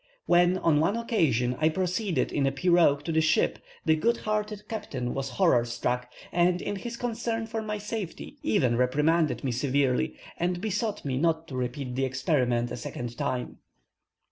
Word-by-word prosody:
When, 175 +1 +4
on 165 -5 +3
one 195 +8 +2
occasion, 135 - +1
I 155 +1 +4
proceeded 180 - -1
in 140 -2 +1
a - - +2
piroque 145 -1 +3
to 165 - -3
the 160 0 +3
ship, 160 0 +2 0.3
the 160 - +4
good 235 +9 +1
hearted 210 -1 -3
captain 130 - -4
was 135 0 -3
horror 120 -1 +3
struck, 125 +1 -2 0.2
and, 175 +1 +3
in 205 - -3
his 235 +4 -6
concern 230 -1 -2
for 225 0 -3
my 210 -1 -3
safety, 210 -3 -6
even 120 +2 +2
reprimanded 150 +7 +2
me 135 - 0
severely, 135 +3 +1 0.2
and 175 +1 0
besought 210 0 -2
me 130 -2 -1
not 165 +1 +1
to 130 - -6
repeat 125 +1 -3
the 135 +2 -1
experiment 125 -3 0
a - - -4
second 120 0 -6
time. 125 +1 -3
160 Hz, 170 wpm, -27 LUFS, 130-195 Hz, 0.3 s, When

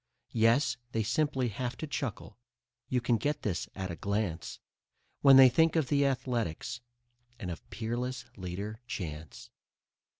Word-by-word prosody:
Yes, 120 +3 +3 0.2
they 110 - +1
simply 135 +1 +1
have 125 +4 -4
to - - -4
chuckle 130 -5 -5 0.5
(you 130 - +2
can 120 -1 +2
get 145 +7 -1
this 95 -5 -2
at 95 -2 -4
a - - -4
glance) 100 -1 -2 0.6
When 135 -1 +8
they 135 -1 +10
think 160 +6 +3
of 155 -6 +1
the 140 -1 +3
Athletics 120 -4 -2 0.6
and 90 -5 -5
of 85 - -9
Peerless 120 +5 -3
Leader 100 +5 -5
Chance. 80 -7 -6
120 Hz, 140 wpm, -31 LUFS, 100-130 Hz, 0.6 s, they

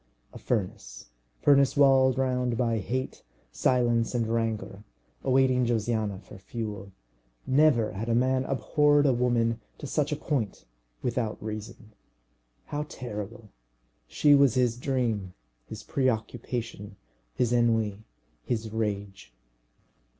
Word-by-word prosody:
A - - -9
furnace 65 - -4 0.3
furnace 140 -1 +4
walled 135 -2 +5
round 125 -2 0
by 115 -2 +1
hate, 130 +6 -4 0.3
silence, 120 - +1
and 120 -2 +1
rancour, 110 -3 -2 0.4
awaiting 130 -1 +3
Josiana 110 -3 -1
for 100 - -13
fuel. 105 -1 -6 0.5
Never 130 -5 +3
had 105 +5 -5
a 115 - +2
man 130 +2 +2
abhorred 145 +1 +2
a 135 - +4
woman 120 -2 +1 0.2
to - - -8
such 145 +1 -1
a - - +1
point 135 -8 -3 0.4
without 115 -3 -1
reason. 110 0 -8 0.7
How 150 +1 -4
terrible! 110 -2 -7 0.6
She 145 - +4
was 140 -4 +5
his 125 -2 +2
dream, 120 -8 -2 0.3
his - - -8
preoccupation, 115 -4 -3 0.4
his 120 -1 +1
ennui, 115 -4 +2 0.4
his 110 - -3
rage. 100 - -4
120 Hz, 115 wpm, -27 LUFS, 110-130 Hz, 0.7 s, walled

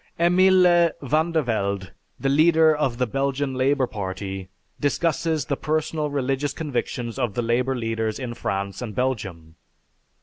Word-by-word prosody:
Emile 180 -1 +5
Vandervelde, 125 - 0 0.3
the 135 - -1
leader 155 +2 +5
of 135 -5 -1
the 125 - +1
Belgian 135 +2 -1
Labor 130 +1 +2
Party, 95 -3 -5 0.3
discusses 160 0 0
the 140 - -1
personal 155 +1 -1
religious 140 0 -1
convictions 125 -5 -3
of 120 -6 -1
the 120 - 0
Labor 125 +3 +1
leaders 115 -2 -2
in 125 -3 -5
France 100 -3 -3
and 110 -5 -6
Belgium. 95 -11 -3
130 Hz, 130 wpm, -24 LUFS, 115-155 Hz, 0.3 s, Emile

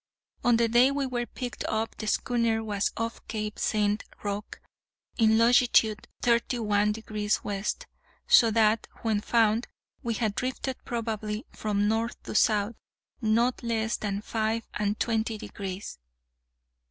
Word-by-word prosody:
On 240 -1 +4
the 235 0 +3
day 240 +3 +5
we 280 0 -1
were 240 -2 -2
picked 245 -2 -5
up 220 +1 -1
the 215 - -5
schooner 230 -1 +1
was 205 -2 -1
off 230 +1 -3
Cape 215 -1 -4
St. 210 -1 +1 0.2
Roque, 205 0 -4 0.6
in 220 -1 +5
longitude 230 -2 +4 0.2
thirty 235 +1 +2
one 210 -2 +2
degrees 210 -1 -2
west; 205 - -3 0.4
so 230 - +7
that, 220 0 +3 0.2
when 220 -2 +1
found, 225 0 +2 0.3
we 230 -1 -2
had 220 -3 0
drifted 255 +2 -3
probably, 220 -2 -3
from 205 -1 0
north 225 +2 0
to - - -6
south, 215 0 +3 0.5
_not 230 +3 +2
less 225 -1 0
than 205 -1 -3
five 220 0 -1
and 210 0 -1
twenty 225 -1 0
degrees! 195 -1 -6
220 Hz, 140 wpm, -28 LUFS, 210-235 Hz, 0.6 s, so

